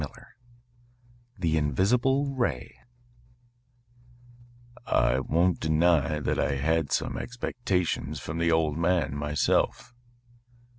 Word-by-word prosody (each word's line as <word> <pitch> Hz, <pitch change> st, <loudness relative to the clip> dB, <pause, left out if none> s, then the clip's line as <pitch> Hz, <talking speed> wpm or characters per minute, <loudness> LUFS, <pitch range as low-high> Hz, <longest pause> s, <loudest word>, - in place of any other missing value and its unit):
XI -, -, -3 dB, 1.3 s
THE 80 Hz, -3 st, 0 dB
INVISIBLE 125 Hz, -, +1 dB
RAY 90 Hz, -, -2 dB, 2.1 s
"I 65 Hz, +2 st, +2 dB
won't 85 Hz, +6 st, +1 dB
deny 80 Hz, -1 st, +2 dB
that -, -, -1 dB
I 65 Hz, -, 0 dB
had 80 Hz, +2 st, 0 dB
some -, -, -1 dB
expectations 90 Hz, -, -2 dB
from 75 Hz, +5 st, -5 dB
the 85 Hz, 0 st, +2 dB
old 80 Hz, -1 st, +1 dB
man 85 Hz, -4 st, +1 dB
myself." 75 Hz, +9 st, 0 dB
80 Hz, 95 wpm, -27 LUFS, 75-90 Hz, 2.1 s, I